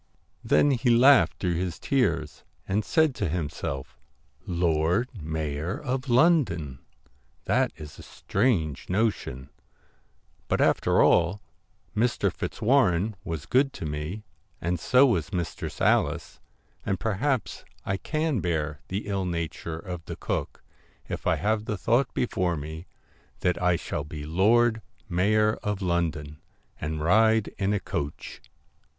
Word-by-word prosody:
Then 145 - +4
he 125 -2 +1
laughed 120 - +6
through 90 -2 -1
his 90 -1 -3
tears, 135 -3 0 0.2
and 105 +3 0
said 160 +4 +2
to 100 -8 -2
himself, 75 -4 -4 0.2
* - - -39
Lord 85 +6 +1
Mayor 80 +3 -3
of 130 -1 -3
London! 120 - +3 0.7
That - - +2
is 75 -2 -11
a - - -8
strange 95 - -1
notion; 90 - -1 1.0
but - - 0
after - - +3
all, 85 +4 +3 0.6
Mr. 120 +3 +1
Fitzwarren 110 -5 +1
was 80 -7 -5
good 135 +1 +2
to - - -6
me, 75 +8 -4 0.4
and 85 0 -1
so 125 +10 +5
was 95 - 0
Mistress 85 -3 -4
Alice, - - +1 0.4
and 95 -2 -1
perhaps 115 +5 -1 0.2
I 95 - -1
can 155 +3 -1
bear 80 -4 -2
the 100 +3 -3
ill 100 -2 -2
nature 85 -1 -4
of 90 0 -7
the - - -6
cook, - - -4 0.4
if - - -4
I - - +4
have 110 +1 0
the 105 - -2
thought 120 +9 +1
before 90 -8 0
me 80 +3 -7 0.5
that 90 - 0
I 90 -1 +3
shall 75 - -4
be 75 0 -7
Lord 110 +7 +3 0.3
Mayor 105 +4 +2
of 105 -2 -2
London 80 -5 -2 0.4
and 75 0 -3
ride 110 +4 +4
in 100 +1 +1
a 105 - +1
coach.' 75 -4 -5
95 Hz, 135 wpm, -26 LUFS, 80-110 Hz, 1.0 s, laughed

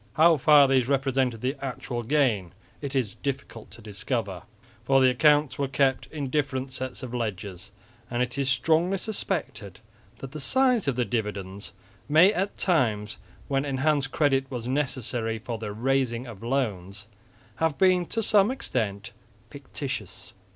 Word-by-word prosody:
How 165 +1 +6
far 145 0 +6
these 130 -2 +2
represented 135 -4 0
the 130 +3 -1
actual 125 -2 -4
gain 115 - +1 0.3
it 140 -1 -5
is 120 -7 0
difficult 135 -5 -5
to 115 - -13
discover, 100 -2 -3 0.4
for 135 +3 +4
the 130 -1 +5
accounts 145 +1 +3
were 140 - +1
kept 135 -1 +1
in 145 -4 -5
different 135 -2 -1
sets 130 0 -6
of 125 -1 -6
ledgers; 100 -5 -4 0.4
and 120 +1 0
it 125 0 -4
is 140 -1 0
strongly 160 +8 +2
suspected 135 - -4 0.4
that 135 - -8
the 155 - -7
size 250 - +2
of 135 - +1
the 125 0 0
dividends 100 -4 -4 0.4
may, 165 +7 +6
at 195 0 -2
times 115 - 0 0.3
when 135 -1 0
enhanced 140 0 0
credit 135 -3 +1
was 120 -2 -5
necessary 125 -4 -2
for 115 +1 -6
the 105 -2 -5
raising 125 +1 0
of 115 -6 -10
loans, 105 -6 -2 0.5
have 160 -3 0
been 185 -2 +3
to 225 - -2
some 210 0 +4
extent 110 - -3 0.4
fictitious. - - -6
130 Hz, 150 wpm, -26 LUFS, 115-145 Hz, 0.5 s, How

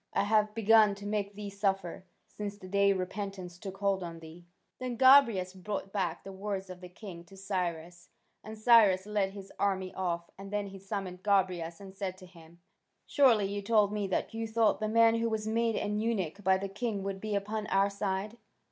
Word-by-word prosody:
I - - +3
have 210 0 +2
begun 220 -2 +5
to 200 0 -10
make 205 -1 -2
thee 205 -1 -6
suffer, 195 -2 -2 0.2
since 205 -1 -6
the 185 - -11
day 200 +1 +3
repentance 185 -1 -4
took 195 -1 -7
hold 195 -1 0
on 170 -2 -6
thee." 165 +2 -13 0.3
Then 250 -2 -4
Gobryas 235 -8 +6
brought 195 +1 -5
back 180 -5 -2
the 195 - -8
words 195 -1 -4
of 180 0 -10
the 180 - -9
king 180 -2 -10
to 195 +3 -16
Cyrus, 175 -3 -4 0.3
and 220 +1 -8
Cyrus 215 -4 +5
led 205 -2 -1
his 195 -1 -10
army 190 -2 0
off, 170 -2 -3
and 195 0 -8
then 205 0 -2
he 195 -1 -9
summoned 195 -2 -5
Gobryas 185 -5 0
and 195 -1 -11
said 190 -2 -4
to 185 - -13
him: 170 -1 -17 0.5
"Surely 250 -9 +4
you 200 +1 -3
told 210 -1 +3
me 205 -2 -1
that 190 - -2
you 225 0 -3
thought 220 -1 +2
the 215 - -1
man 230 +1 +5
who 230 0 0
was 220 -1 -2
made 230 0 +1
an 210 0 -1
eunuch 205 -4 -2
by 190 0 +4
the 195 +1 -4
king 205 0 -3
would 195 -1 -4
be 215 -1 -2
upon 210 +1 -3
our 195 +1 +2
side?" 200 +2 -3
200 Hz, 200 wpm, -30 LUFS, 185-210 Hz, 0.5 s, Gobryas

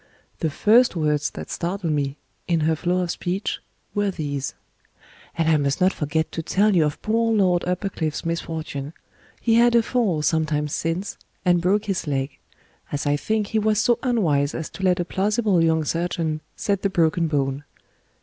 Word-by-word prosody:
The 160 - 0
first 220 - +4
words 150 -2 +1
that - - -8
startled 175 -2 -2
me, 140 -1 -1 0.3
in 170 -2 +1
her 160 +1 +2
flow 180 +3 0
of 175 -2 -1
speech, 185 +3 -2 0.3
were 205 -1 +1
these: 145 -6 -3 0.8
"And 165 -1 +1
I 160 -1 +5
must 140 -1 0
not 185 +1 +3
forget 160 +1 -1
to 165 - -3
tell 200 +5 +2
you 165 -3 +4
of 150 0 -2
poor 230 +1 +1
Lord 185 -5 +3
Uppercliff's 180 -4 -2
misfortune. 160 -3 -4 0.5
He 225 -1 +3
had 240 0 +5
a 235 - +5
fall, 215 -11 0
some 160 0 +2
time 150 -1 0
since, 165 +6 -2 0.3
and 175 -1 +4
broke 200 +4 +2
his 190 -5 -2
leg. 135 -1 -2 0.5
As 145 +1 -2
I 145 0 +2
think, 215 +7 -1
he 220 - +1
was 215 0 +2
so 240 +2 +3
unwise 160 - +1
as 160 - -5
to - - -9
let 180 -1 +3
a 175 - 0
plausible 200 -1 +1
young 160 -1 +2
surgeon 165 -2 -1
set 200 -2 -1
the 200 - +1
broken 165 -1 +2
bone. 140 -2 -1
170 Hz, 180 wpm, -23 LUFS, 155-200 Hz, 0.8 s, I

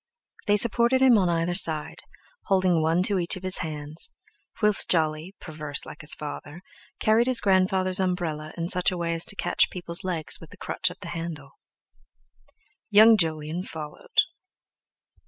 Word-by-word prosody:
They 205 0 +4
supported 235 +4 +3
him 255 -3 +6
on 185 -2 +1
either 170 +1 0
side, 160 -4 0 0.5
holding 185 -4 +2
one 165 +3 +1
to 195 0 +2
each 175 +3 +1
of 185 - -10
his 185 0 0
hands,—whilst 160 - -2
Jolly, 160 +2 0
perverse 150 -3 -6
like 155 - -10
his 150 - -3
father, 150 +3 -8 0.4
carried 225 +3 +3
his 255 -2 +4
grandfather's 185 -1 +1
umbrella 170 -5 -2
in 170 0 -2
such 180 0 +2
a 180 - -4
way 170 -1 -2
as 165 0 -1
to - - -2
catch - - +1
people's 175 -2 -1
legs 170 -4 -1
with 165 - -12
the - - -15
crutch 185 - -1
of 180 - -11
the 175 - -8
handle. 165 -5 -6 1.4
Young 220 +2 +7
Jolyon 160 -2 -2
followed. 160 - -2
175 Hz, 155 wpm, -25 LUFS, 160-190 Hz, 1.4 s, Young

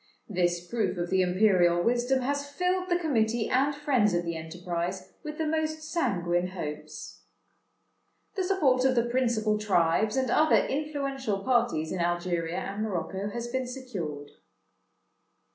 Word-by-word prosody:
This 175 -3 0
proof 225 -3 -1
of 175 +1 -3
the 190 0 +4
imperial 180 -2 +3
wisdom 245 +3 +2
has 285 +2 -2
filled 365 +4 -1
the 350 - +3
Committee 235 -9 +1
and 275 +3 +2
friends 255 - +2
of 175 0 0
the 170 0 -2
enterprise 175 +2 -4
with 305 -1 -7
the 320 - -1
most 315 0 -1
sanguine 180 - 0
hopes. 155 -5 -7 1.1
"The 385 - -1
support 300 -10 +2
of 260 -1 +3
the 235 -1 +3
principal 235 -4 +1
tribes, 210 +2 +2
and 260 -1 +1
other 310 +1 +4
influential 275 -8 -2
parties 240 -11 +1
in 185 - -3
Algeria 175 -1 -1
and 200 +2 -4
Morocco, 195 -1 -2
has 235 +3 -4
been 260 +1 -2
secured. 190 - -6
220 Hz, 145 wpm, -28 LUFS, 175-270 Hz, 1.1 s, the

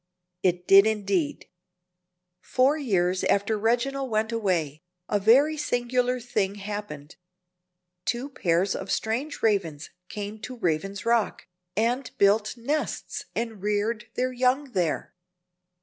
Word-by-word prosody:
It 180 -1 0
did, 195 +2 +8
indeed. 200 -7 -1 0.9
Four 265 +3 +2
years 185 - 0
after 200 +2 +2
Reginald 245 +5 0
went 220 0 0
away, 175 -10 -1 0.3
a 205 - +1
very 270 +10 +5
singular 250 -2 0
thing 205 -5 -1
happened. 200 -8 -7 0.9
Two 245 +3 -1
pairs 185 -4 +1
of - - -5
strange 245 +7 -2
Ravens 170 -9 0 0.2
came 210 +1 -6
to 250 +4 -7
Raven's 195 +2 -2
Rock, 230 -2 +1 0.3
and 245 +4 +1
built 210 +2 +3
nests 285 +7 -3
and 225 -4 -3
reared 210 +2 -1
their 255 0 0
young 255 +2 +1
there. 175 -7 -1
215 Hz, 120 wpm, -26 LUFS, 195-245 Hz, 0.9 s, did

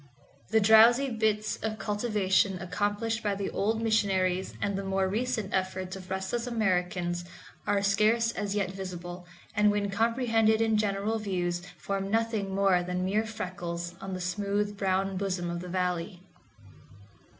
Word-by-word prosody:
The 220 - +4
drowsy 230 +5 +6
bits 215 -1 0
of 220 -1 -3
cultivation 205 -3 +1
accomplished 205 +5 -1
by 205 -2 0
the 195 0 -3
old 220 +3 0
missionaries 190 -4 +1
and 200 0 -1
the 195 - -3
more 195 0 0
recent 220 0 -2
efforts 185 0 -2
of 185 -1 -10
restless 190 +6 -2
Americans 180 -6 0 0.4
are 200 -1 +2
scarce 215 +3 +3
as 205 -2 -3
yet 195 -3 0
visible, 180 -2 -7 0.3
and 210 0 +4
when 205 -1 0
comprehended 225 0 +2
in 225 -1 +2
general 210 +1 0
views 175 -4 -1 0.2
form 195 0 -3
nothing 225 -2 0
more 195 -2 +3
than 180 +1 -2
mere 215 +4 +1
freckles 175 -5 -5
on 195 -1 -4
the 185 - -5
smooth 205 +3 -1
brown 195 -1 0
bosom 185 -3 -2
of 170 - -3
the 180 +1 -7
Valley. 180 0 -2
200 Hz, 150 wpm, -29 LUFS, 185-220 Hz, 0.4 s, drowsy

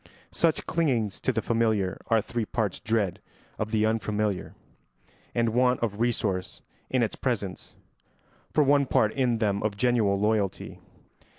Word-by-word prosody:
Such 165 -2 +1
clingings 125 - 0
to 130 - 0
the 110 -2 -2
familiar 110 -5 0
are 115 -2 +3
three 120 -1 -3
parts 105 -4 -2
dread 110 -5 -1 0.4
of 110 - -1
the 110 -1 +2
unfamiliar 105 -3 -1 0.8
and 115 -1 +2
want 125 +2 +2
of 110 -3 -2
resource 110 -6 -1 0.3
in - - +2
its - - -2
presence, - - -3 0.8
for 150 - +4
one 140 0 +3
part 110 -3 +2
in 125 -4 +1
them 100 -3 0
of 105 -2 -2
genuine 110 -5 +2
loyalty. 105 -2 -1
110 Hz, 140 wpm, -27 LUFS, 105-120 Hz, 0.8 s, for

